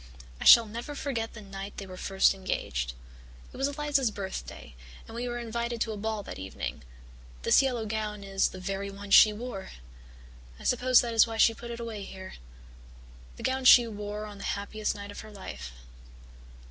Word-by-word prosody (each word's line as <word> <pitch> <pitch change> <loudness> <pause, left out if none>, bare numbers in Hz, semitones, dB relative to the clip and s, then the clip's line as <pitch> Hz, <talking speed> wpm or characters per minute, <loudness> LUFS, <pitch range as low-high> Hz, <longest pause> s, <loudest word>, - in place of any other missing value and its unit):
"I - - -5
shall 235 - +10
never 235 +7 -6
forget 235 -6 -3
the 215 - -9
night 195 0 -8
they 200 - -5
were 185 -1 -9
first 195 +1 +3
engaged. 65 - -3 0.6
It - - -10
was 270 +1 +1
Eliza's 285 -3 +1
birthday, 195 - -7 0.3
and - - -11
we 240 +2 -3
were 240 0 -3
invited 235 0 -3
to 225 - 0
a 215 - -5
ball 215 0 -3
that - - -8
evening. 95 0 -5 0.6
This - - +6
yellow 250 -4 -1
gown 210 -1 -3
is 195 0 +1
the 185 - -9
very 195 +1 -3
one 200 0 -9
she 215 - +9
wore. 210 -3 -6 0.9
I - - -12
suppose 250 0 +4
that 235 -1 -3
is 225 +1 +6
why 225 0 -5
she 225 - +6
put 235 +1 -9
it 235 0 -6
away 230 -3 -5
here 190 -1 -9 1.0
the - - -10
gown 260 0 0
she 245 -1 +9
wore 210 -1 -5
on 205 -1 -10
the - - -8
happiest 210 +1 -3
night 200 0 -8
of - - -9
her 220 - -9
life. 70 - -8
215 Hz, 190 wpm, -29 LUFS, 195-235 Hz, 1.0 s, shall